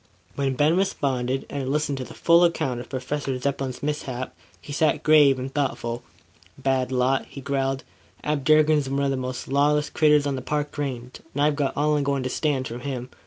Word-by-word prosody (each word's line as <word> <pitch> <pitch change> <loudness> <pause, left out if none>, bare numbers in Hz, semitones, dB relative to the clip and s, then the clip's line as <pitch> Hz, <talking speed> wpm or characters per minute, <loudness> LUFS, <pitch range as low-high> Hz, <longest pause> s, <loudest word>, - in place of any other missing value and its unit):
When 135 -2 -1
Ben 150 +5 +3
responded, 135 -9 0
and 140 - -5
had 130 - -3
listened 145 -1 0
to - - -3
the - - -11
full 170 +1 +5
account 135 -7 +1
of 120 - -9
Professor 135 0 -3
Zepplin's 135 -1 -3
mishap, 135 -4 -3 0.3
he 145 - -9
sat 155 +1 +1
grave 150 -3 +6
and 130 +1 -5
thoughtful. 120 -4 -2 0.6
"Bad 130 -1 0
lot," 130 +1 +1
he - - -9
growled. 135 0 -1 0.4
"Ab 150 -2 -1
Durkin's 155 -1 +4
one 140 +1 0
of 140 - +1
the - - 0
most 130 0 -4
lawless 145 +2 +2
critters 150 -2 +4
on 140 -1 0
the 130 - -4
Park 150 +2 -2
Range; 130 -4 -4 0.2
and 145 - 0
I've 150 0 +3
got 145 -2 -1
all 150 +1 +2
I'm 145 - 0
goin' 140 -1 0
to 130 - -2
stand 140 -4 0
from 120 +1 -6
him. 125 -1 -5
140 Hz, 205 wpm, -24 LUFS, 130-150 Hz, 0.6 s, grave